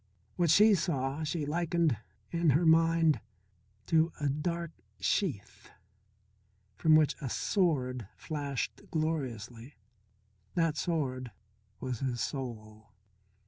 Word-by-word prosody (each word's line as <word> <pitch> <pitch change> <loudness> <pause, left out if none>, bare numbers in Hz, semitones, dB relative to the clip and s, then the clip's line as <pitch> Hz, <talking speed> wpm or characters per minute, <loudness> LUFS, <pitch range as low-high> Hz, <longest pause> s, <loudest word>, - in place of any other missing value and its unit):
What 175 -2 +2
she 210 +6 +7
saw 145 -5 -1
she 155 0 -2
likened 170 -2 +1 0.4
in 170 -1 +2
her 150 +5 +3
mind 165 -1 +4 0.7
to 160 0 +3
a 145 -1 0
dark 170 +3 -2 0.3
sheath 100 - -2 1.1
from 155 - +4
which 155 -2 +4
a 135 - -3
sword 130 - 0
flashed 145 -4 -4
gloriously. 130 -6 -3 0.8
That 165 -3 +2
sword 135 -7 -2 0.5
was 125 -3 -4
his 125 -3 -2
soul. 110 -6 -5
150 Hz, 100 wpm, -31 LUFS, 130-165 Hz, 1.1 s, she